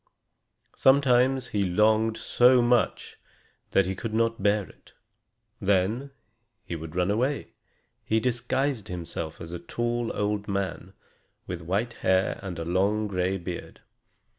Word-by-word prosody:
Sometimes 130 -1 +4
he 100 -1 0
longed 110 +4 +2
so 125 +1 +4
much 120 0 +1 0.5
that 95 - +3
he 95 - -2
could 110 +3 -5
not 115 -1 +1
bear 105 +1 +2
it. - - -20 0.7
Then 100 +6 +1 0.6
he 85 - -4
would 80 0 -8
run 90 +2 +1
away. 130 +7 -1 0.5
He 110 - +1
disguised 125 0 -1
himself 85 -2 -6
as 85 -1 -8
a 85 - -5
tall 120 +6 -2
old 105 0 -1
man, 100 -1 -3 0.5
with - - -5
white 100 +8 -1
hair 95 0 +2
and 95 -4 -6
a 80 - -4
long 100 +5 +1
gray 95 -1 0
beard. 90 -1 -7
105 Hz, 135 wpm, -27 LUFS, 95-120 Hz, 0.7 s, Sometimes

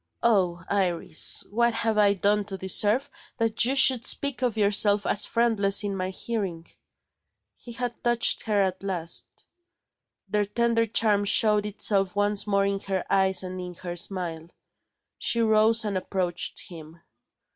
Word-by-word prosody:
Oh, 185 -7 +1
Iris, 180 -5 +2
what 235 +1 +1
have 225 -1 -1
I 205 -1 +3
done 205 +2 0
to 195 -1 -7
deserve 210 +8 +2 0.3
that 225 0 +1
you 260 +3 0
should 260 -3 +4
speak 280 -2 -2
of 240 -3 -1
yourself 205 0 +2
as 210 - +2
friendless 215 -4 +2
in 200 -1 -3
my 185 -1 -3
hearing!" 190 -5 -5 0.9
He 240 - -12
had 245 0 -5
touched 240 -1 +3
her 210 -2 +1
at 190 -1 -3
last. 175 -4 -3 1.0
Their 210 -1 -1
tender 230 +2 0
charm 210 -1 +2
showed 210 0 +3
itself 200 -1 0
once 205 0 +1
more 200 -1 +1
in 200 0 -2
her 195 -1 -4
eyes 190 -1 +2
and 185 0 -7
in 180 -1 -8
her 175 0 -7
smile. 170 -3 -3 0.7
She 235 - 0
rose 220 0 +2
and 205 -2 -3
approached 185 -2 -3
him. 165 -1 -13
205 Hz, 150 wpm, -25 LUFS, 185-225 Hz, 1.0 s, should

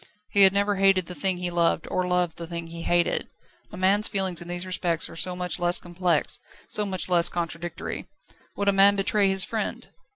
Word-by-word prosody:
He 200 - +3
had 190 -1 +8
never 200 +1 +1
hated 195 -2 +3
the 180 - -7
thing 190 0 0
he 180 0 -3
loved 170 -1 +1
or 185 0 0
loved 180 -2 0
the 170 - -6
thing 170 0 -5
he 165 0 -8
hated. 175 0 0 0.4
A 210 - -9
man's 195 +3 +3
feelings 190 -3 -1
in 170 - -9
these 175 +1 -4
respects 175 -3 -1
are - - -11
so 180 +2 -3
much 180 0 -3
less 175 0 +4
complex, 175 -3 -1 0.3
so 210 -1 -1
much 185 -2 -3
less 175 -2 +4
contradictory. 170 0 -5 0.5
Would 200 - -1
a - - +3
man 200 +1 +6
betray 200 0 +2
his 190 -1 +2
friend? 220 -2 -4
180 Hz, 205 wpm, -25 LUFS, 175-195 Hz, 0.5 s, had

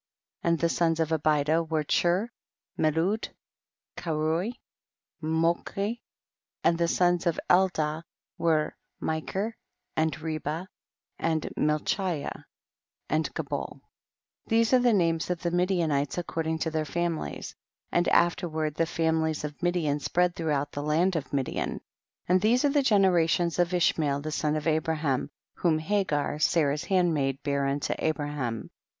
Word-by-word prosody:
13. - - 0
And 165 - +1
the 170 - +2
sons 165 -1 +1
of 160 -1 +1
Abida 155 0 +2
were 160 -1 -1
Chur, 180 +9 +1 0.4
Melud, 165 +8 +1 0.7
Keruy, 165 +6 -1 0.7
Molchi; 170 +7 0 0.6
and 170 - +4
the 170 - +3
sons 175 +1 +2
of 170 - +1
Eldaah 160 -4 +2 0.3
were 155 -2 +1 0.2
Mikcr, 190 +7 -2 0.4
and 155 0 0
Reba, 155 +2 -3 0.5
and 160 -2 0
Malchiyah 155 +2 -1 0.6
and 155 +1 0
Gabol; - - -4 0.7
these 230 +1 +3
are 255 - +7
the 245 -1 +4
names 165 -5 +1
of 180 0 -2
the 170 - 0
Midianites 170 -6 +1
according 165 -2 -2
to 160 0 -2
their 155 0 0
families; 165 - -3 0.4
and 175 0 +2
af 175 0 +4
terward 155 -4 -2
the 165 - +2
families 160 -2 0
of 150 -1 -6
Midian 170 -5 +1
spread 175 +5 +1
throughout 145 -3 -1
the 145 - -4
land 165 +5 +2
of 155 -4 -3
Midian. 135 -2 -1
14. - - -8 0.5
And 185 0 +4
these 240 +6 +3
are - - +4
the 285 0 +3
generations 180 - +3
of 175 0 +3
Ishmael 155 -5 +2
the 155 +1 -4
son 150 0 0
of 155 - -3
Abraham, 155 -4 0 0.3
whom 165 -3 +2
Hagar, 155 -4 0
Sarah's 150 -2 +2
handmaid, 155 -8 +1
bare 140 -1 0
unto 140 +1 -1
Abraham. 145 -7 -2
160 Hz, 140 wpm, -28 LUFS, 150-175 Hz, 0.7 s, are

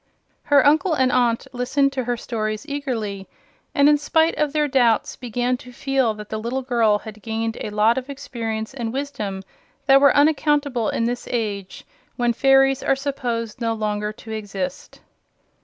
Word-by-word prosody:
Her 290 0 +4
uncle 315 +4 +4
and 260 -2 +2
aunt 240 -2 +2
listened 275 +3 +1
to 260 -2 -2
her 245 0 -1
stories 215 0 -3
eagerly 230 -9 -4 0.5
and 280 0 +5
in 295 0 +5
spite 320 +2 +2
of 300 -1 0
their 300 0 +1
doubts 245 -5 +2
began 245 +1 -1
to 250 - -13
feel 260 -3 0
that 210 0 -10
the 220 - -3
little 245 +4 -3
girl 230 -4 +2
had 215 0 -11
gained 225 +1 -3
a - - -3
lot 215 +4 +3
of 260 +2 -12
experience 230 -5 -5
and 235 -4 -4
wisdom 215 -8 -4 0.4
that 275 0 +6
were 280 - +6
unaccountable 290 -5 +2
in - - -1
this 245 +1 -2
age, 205 -5 -3 0.3
when 240 -1 +1
fairies 270 +1 +4
are 270 - +2
supposed 245 -5 -3
no 230 -1 0
longer 210 -1 -2
to 220 +1 -11
exist. 200 -4 -5
245 Hz, 170 wpm, -22 LUFS, 220-275 Hz, 0.5 s, that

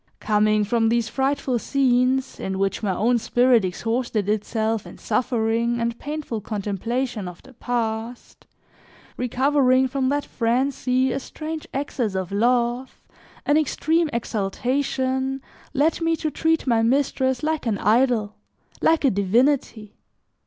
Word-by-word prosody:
Coming 215 0 +2
from 225 +2 +1
these 230 -1 +1
frightful 270 -1 0
scenes, 260 0 +1
in 190 0 -3
which 195 0 -1
my 210 - -1
own 235 +6 +2
spirit 245 0 +3
exhausted 225 +2 -2
itself 220 +1 -1
in - - -11
suffering 230 0 0
and 235 0 -2
painful 295 -7 -4
contemplation 215 +2 -3
of 180 -1 -10
the 265 - -16
past; 235 -1 -4 0.7
recovering 260 +1 +2
from 260 0 -1
that 290 +1 0
frenzy, 255 +2 0
a 270 - -1
strange 310 +3 -7
access 255 -7 -2
of 190 0 -3
love, 240 +4 0 0.4
an 290 - +3
extreme 315 +2 +1
exaltation, 260 +4 -1 0.3
led 305 +5 +1
me 330 0 +2
to 315 -1 -3
treat 325 +1 +1
my 230 -3 +2
mistress 260 +1 +1
like 310 -4 -1
an 215 -3 +1
idol, 220 -1 +2 0.5
like 320 -2 +3
a 265 - +5
divinity. 215 +2 +1
245 Hz, 130 wpm, -23 LUFS, 220-270 Hz, 0.7 s, a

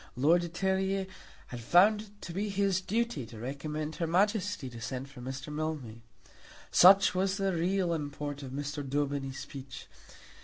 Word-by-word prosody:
Lord 155 +7 +4
de 170 - -4
Terrier 190 +2 0 0.4
had 120 - -6
found 190 - +5
it 215 - -12
to 170 - -7
be 205 +4 -2
his 195 -2 +1
duty 220 - -1
to 115 - -11
recommend 150 +5 -4
her 165 - -1
Majesty 200 - +1
to 120 -2 -9
send 130 +3 -5
for 130 -3 -11
Mr. 130 +3 -6
Mildmay. 150 -8 -4 0.7
Such 195 +2 +7
was 190 +1 0
the 195 -2 0
real 175 +1 +1
import 145 -2 -4
of 135 - -7
Mr. 145 +2 -4
Daubeny's 140 -1 -2
speech. 135 -2 -8
155 Hz, 160 wpm, -30 LUFS, 135-190 Hz, 0.7 s, Such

